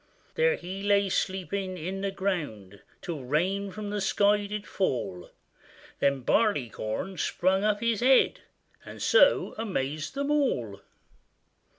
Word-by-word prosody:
There 480 Hz, 0 st, +3 dB
he 190 Hz, +2 st, -7 dB
lay 200 Hz, -1 st, +2 dB
sleeping 190 Hz, 0 st, -2 dB
in 185 Hz, +4 st, -4 dB
the 200 Hz, -, -1 dB
ground, 150 Hz, -, -4 dB, 0.2 s
Till 170 Hz, -5 st, -4 dB
rain 180 Hz, +10 st, 0 dB
from 205 Hz, +1 st, -6 dB
the 205 Hz, -1 st, -2 dB
sky 205 Hz, +1 st, +2 dB
did 210 Hz, 0 st, -5 dB
fall: 100 Hz, -, -2 dB, 0.7 s
Then 140 Hz, -1 st, +2 dB
Barleycorn 150 Hz, -, 0 dB
sprung 190 Hz, +5 st, +1 dB
up 210 Hz, 0 st, +1 dB
his 230 Hz, -2 st, +1 dB
head, 260 Hz, +2 st, +4 dB, 0.4 s
And -, -, -10 dB
so -, -, +4 dB
amazed 155 Hz, -, -3 dB
them 280 Hz, +1 st, -1 dB
all. 120 Hz, -, 0 dB
195 Hz, 125 wpm, -28 LUFS, 150-210 Hz, 0.7 s, head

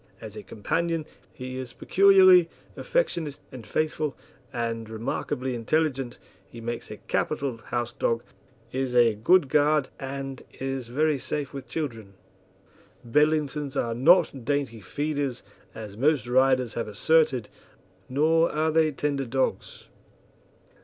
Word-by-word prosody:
As -, -, -9 dB
a -, -, -6 dB
companion 165 Hz, +9 st, -2 dB, 0.3 s
he 130 Hz, 0 st, -7 dB
is 125 Hz, -2 st, -7 dB
peculiarly 185 Hz, -3 st, +6 dB, 0.3 s
affectionate 170 Hz, -, -1 dB
and 125 Hz, -4 st, -10 dB
faithful, 155 Hz, -2 st, -1 dB, 0.3 s
and 115 Hz, -2 st, -3 dB
remarkably 120 Hz, +3 st, -3 dB
intelligent; 135 Hz, +1 st, -1 dB, 0.3 s
he 120 Hz, -, -11 dB
makes 120 Hz, +1 st, -5 dB
a -, -, -7 dB
capital 135 Hz, -4 st, -2 dB
house 120 Hz, -1 st, -2 dB
dog, 115 Hz, 0 st, 0 dB, 0.5 s
is 130 Hz, -1 st, -2 dB
a 120 Hz, -2 st, +5 dB
good 145 Hz, -, +4 dB
guard 150 Hz, 0 st, +3 dB
and 135 Hz, -1 st, -5 dB, 0.2 s
is 135 Hz, -2 st, -3 dB
very 150 Hz, +4 st, +1 dB
safe 145 Hz, +1 st, -4 dB
with 135 Hz, -2 st, -7 dB
children. 115 Hz, -10 st, -5 dB, 0.9 s
Bedlingtons 150 Hz, +1 st, +1 dB
are 115 Hz, -3 st, 0 dB
not 135 Hz, +1 st, +4 dB
dainty 140 Hz, -5 st, -1 dB
feeders, 140 Hz, +4 st, -3 dB, 0.3 s
as 105 Hz, -3 st, -8 dB
most 145 Hz, +4 st, +2 dB
writers 130 Hz, -1 st, +3 dB
have 115 Hz, -, -3 dB
asserted, 130 Hz, +1 st, +2 dB, 0.6 s
nor 160 Hz, +5 st, +3 dB
are 155 Hz, +1 st, +1 dB
they 160 Hz, -1 st, +3 dB
tender 140 Hz, -1 st, -2 dB
dogs. 130 Hz, +2 st, -2 dB
135 Hz, 125 wpm, -26 LUFS, 120-155 Hz, 0.9 s, peculiarly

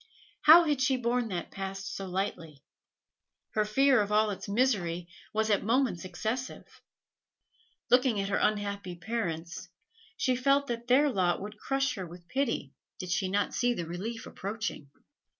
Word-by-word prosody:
How 330 Hz, +3 st, +10 dB
had 295 Hz, -5 st, 0 dB
she 260 Hz, 0 st, +3 dB
borne 245 Hz, 0 st, 0 dB
that 180 Hz, -5 st, -4 dB
past 195 Hz, 0 st, -5 dB
so 195 Hz, -, -5 dB
lightly? 180 Hz, -6 st, -4 dB, 0.9 s
Her 215 Hz, -, +1 dB
fear 260 Hz, +3 st, +4 dB
of 205 Hz, 0 st, -2 dB
all 215 Hz, 0 st, +3 dB
its 200 Hz, -, -6 dB
misery 195 Hz, -7 st, +1 dB, 0.2 s
was 220 Hz, 0 st, 0 dB
at 200 Hz, -, +2 dB
moments 230 Hz, -5 st, +1 dB
excessive. 220 Hz, +8 st, -4 dB, 1.3 s
Looking 250 Hz, -3 st, +4 dB
at 195 Hz, 0 st, -2 dB
her 195 Hz, -, +1 dB
unhappy 200 Hz, -3 st, -1 dB
parents, 175 Hz, -5 st, -4 dB, 0.5 s
she 260 Hz, -, +1 dB
felt 275 Hz, +3 st, +3 dB
that 235 Hz, -2 st, -5 dB
their 270 Hz, +4 st, +5 dB
lot 180 Hz, -5 st, +1 dB
would 210 Hz, +2 st, -8 dB
crush 270 Hz, +1 st, 0 dB
her 190 Hz, -6 st, -6 dB
with 175 Hz, +1 st, -13 dB
pity 235 Hz, -, -1 dB, 0.2 s
did 180 Hz, -1 st, -5 dB
she 185 Hz, 0 st, 0 dB
not 205 Hz, +2 st, 0 dB
see 245 Hz, 0 st, +1 dB
the 170 Hz, -, -3 dB
relief 200 Hz, +8 st, -5 dB
approaching. 200 Hz, -7 st, -5 dB
210 Hz, 155 wpm, -29 LUFS, 185-250 Hz, 1.3 s, How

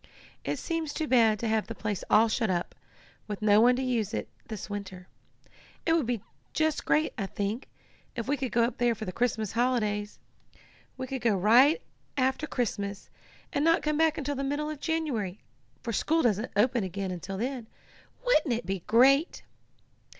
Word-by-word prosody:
"It -, -, -2 dB
seems 325 Hz, -3 st, -3 dB
too 315 Hz, -, -1 dB
bad 225 Hz, -5 st, +4 dB
to 230 Hz, -, -3 dB
have 220 Hz, -1 st, +1 dB
the -, -, -6 dB
place 210 Hz, -4 st, -3 dB
all 220 Hz, +2 st, +6 dB
shut 225 Hz, -1 st, 0 dB
up, 175 Hz, -2 st, -1 dB, 0.5 s
with 210 Hz, -2 st, -4 dB
no 210 Hz, 0 st, +6 dB
one 245 Hz, +2 st, +6 dB
to 260 Hz, -, -2 dB
use 230 Hz, -4 st, -1 dB
it -, -, -3 dB, 0.2 s
this 215 Hz, -6 st, -6 dB
winter. 190 Hz, -3 st, -7 dB, 0.8 s
It 325 Hz, -, +3 dB
would 320 Hz, -8 st, +2 dB
be 240 Hz, -4 st, -2 dB, 0.3 s
just 315 Hz, -1 st, 0 dB
great, 310 Hz, +1 st, +2 dB
I 195 Hz, -, -1 dB
think, 205 Hz, +5 st, -3 dB, 0.5 s
if 235 Hz, -2 st, -4 dB
we 285 Hz, -, +2 dB
could 265 Hz, -3 st, -3 dB
go 235 Hz, -, +3 dB
up 235 Hz, -, -1 dB
there 240 Hz, -1 st, +3 dB
for 220 Hz, 0 st, -6 dB
the 185 Hz, -, -4 dB
Christmas 220 Hz, -1 st, -1 dB
holidays. 215 Hz, -4 st, 0 dB, 0.8 s
We 260 Hz, -, -3 dB
could 260 Hz, 0 st, -5 dB
go 225 Hz, -4 st, +2 dB
up 180 Hz, -, -5 dB
right 260 Hz, -, +6 dB, 0.3 s
after 265 Hz, +3 st, +1 dB
Christmas, 205 Hz, -6 st, -3 dB, 0.4 s
and 285 Hz, -, +1 dB
not 330 Hz, +1 st, +3 dB
come 300 Hz, 0 st, 0 dB
back 320 Hz, 0 st, +3 dB
until 290 Hz, -2 st, -2 dB
the 275 Hz, 0 st, -3 dB
middle 290 Hz, +2 st, -1 dB
of 305 Hz, -, -7 dB
January, 275 Hz, -, -2 dB, 0.4 s
for 230 Hz, -, -3 dB
school 325 Hz, +8 st, +1 dB
doesn't 215 Hz, 0 st, +1 dB
open 240 Hz, +2 st, +3 dB
again 190 Hz, +1 st, -3 dB
until 185 Hz, +2 st, -5 dB
then. 245 Hz, +1 st, -3 dB, 0.6 s
Wouldn't 310 Hz, -, +3 dB
it 230 Hz, -, -5 dB
be 195 Hz, +1 st, -2 dB
great!" 275 Hz, +7 st, +4 dB
235 Hz, 185 wpm, -28 LUFS, 210-280 Hz, 0.8 s, all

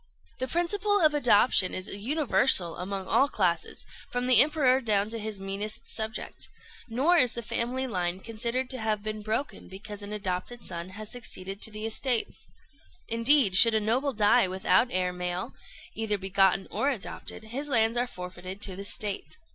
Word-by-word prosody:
The 260 Hz, -, -2 dB
principle 405 Hz, +6 st, +1 dB
of 310 Hz, -4 st, +4 dB
adoption 235 Hz, -8 st, +4 dB
is 185 Hz, -, -2 dB
universal 240 Hz, -, +1 dB
among 190 Hz, +1 st, -4 dB
all 275 Hz, +8 st, +2 dB
classes, 175 Hz, -8 st, -1 dB, 0.2 s
from 245 Hz, 0 st, -2 dB
the 250 Hz, -2 st, +8 dB
Emperor 275 Hz, -3 st, +3 dB
down 210 Hz, -3 st, 0 dB
to 230 Hz, -, -4 dB
his 215 Hz, -2 st, -5 dB
meanest 205 Hz, +4 st, -5 dB
subject; 220 Hz, -1 st, -5 dB, 0.4 s
nor 280 Hz, +10 st, +2 dB
is 250 Hz, -6 st, +4 dB
the 235 Hz, -, -5 dB
family 250 Hz, +4 st, -2 dB
line 180 Hz, -6 st, -2 dB
considered 235 Hz, +4 st, -2 dB
to 260 Hz, -, -5 dB
have 215 Hz, -2 st, -1 dB
been 215 Hz, 0 st, -5 dB
broken 220 Hz, +6 st, -4 dB
because 205 Hz, +2 st, -9 dB
an 205 Hz, 0 st, -7 dB
adopted 200 Hz, +3 st, -4 dB
son 170 Hz, 0 st, -3 dB
has 215 Hz, -1 st, -6 dB
succeeded 195 Hz, -5 st, -4 dB
to -, -, +2 dB
the 215 Hz, 0 st, -6 dB
estates. 235 Hz, +1 st, -1 dB, 0.6 s
Indeed, 230 Hz, -2 st, +4 dB
should 230 Hz, +3 st, +7 dB
a -, -, +3 dB
noble 250 Hz, +6 st, 0 dB
die 210 Hz, 0 st, +4 dB
without 185 Hz, +4 st, +2 dB
heir 180 Hz, -2 st, -1 dB
male, 180 Hz, 0 st, -4 dB, 0.4 s
either 220 Hz, -1 st, -1 dB
begotten 195 Hz, 0 st, +2 dB
or 275 Hz, -, 0 dB
adopted, 230 Hz, -3 st, -6 dB
his 265 Hz, +7 st, -5 dB
lands 225 Hz, -3 st, +3 dB
are 245 Hz, +1 st, 0 dB
forfeited 185 Hz, -1 st, -8 dB
to 190 Hz, -, -4 dB
the 195 Hz, -, -7 dB
State. 205 Hz, +6 st, -2 dB
220 Hz, 170 wpm, -27 LUFS, 195-250 Hz, 0.6 s, the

